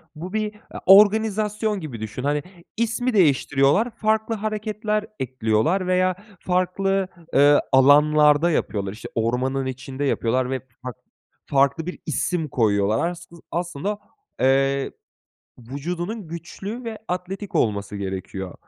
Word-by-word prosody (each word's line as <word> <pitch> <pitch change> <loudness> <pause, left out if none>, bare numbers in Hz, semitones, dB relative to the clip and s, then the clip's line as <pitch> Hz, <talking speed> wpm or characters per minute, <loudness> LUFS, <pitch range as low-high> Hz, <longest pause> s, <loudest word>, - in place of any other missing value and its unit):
bu 175 +5 -7
bir 215 -1 -2 0.2
a - - -7
organizasyon 210 +1 +4
gibi 145 -9 -7
düşün. 110 +3 -6
Hani, 145 +1 0 0.3
ismi 235 +2 0
değiştiriyorlar, 145 - +3
farklı 220 0 0
hareketler 215 0 -2
ekliyorlar 130 - 0
veya 185 0 +2 0.2
farklı, 185 +1 0 0.3
eee, 145 +1 +6
alanlarda 150 +4 +5
yapıyorlar. 100 -10 -1
İşte, 110 - -9
ormanın 125 +4 0
içinde 130 +1 -5
yapıyorlar 130 -2 0
ve 130 0 -1 0.2
fark 125 -2 -6 0.5
farklı 140 +4 +2
bir 180 - -5
isim 155 +3 -1
koyuyorlar 110 +2 +1
assı 175 0 -10 0.2
aslında, 175 +4 -3 0.4
eee, 135 +1 +2 0.7
vücudunun 170 - -5
güçlü 195 +8 -7
ve 225 -2 -5
atletik 185 +3 -5
olması 105 -2 0
gerekiyor. 95 -1 -5
160 Hz, 115 wpm, -23 LUFS, 130-200 Hz, 0.7 s, eee